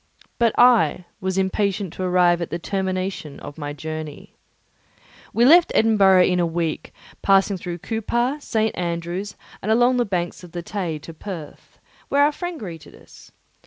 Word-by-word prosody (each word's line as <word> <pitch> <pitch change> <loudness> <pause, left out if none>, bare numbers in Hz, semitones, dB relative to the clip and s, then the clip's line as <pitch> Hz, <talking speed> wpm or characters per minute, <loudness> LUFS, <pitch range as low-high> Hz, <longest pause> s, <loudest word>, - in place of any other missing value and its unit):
But 230 -2 +2
I 240 -7 +4
was 190 0 -2
impatient 190 -1 0
to - - -7
arrive 180 -1 +3
at 170 - -3
the 170 - -3
termination 185 -5 -3
of 145 +2 -9
my 145 -1 -4
journey. 155 0 -7 1.0
We 235 - +3
left 335 +5 +6
Edinburgh 195 -4 +5
in 180 -1 +2
a 175 - +2
week, 165 -1 -3 0.3
passing 195 0 +3
through 175 -1 -5
Coupar, 240 +5 -1
St. 220 -4 -1
Andrew's, 175 +3 -3 0.3
and 215 - -1
along 245 +3 +4
the 245 - +2
banks 180 -3 -3
of 175 -1 -13
the 175 -1 -5
Tay, 175 -5 -3
to 160 +3 -11
Perth, 165 -3 -9 0.3
where 285 +1 +4
our 295 - +4
friend 350 +3 -5
expected 170 -6 -9
us. - - -17
185 Hz, 165 wpm, -22 LUFS, 170-220 Hz, 1.0 s, left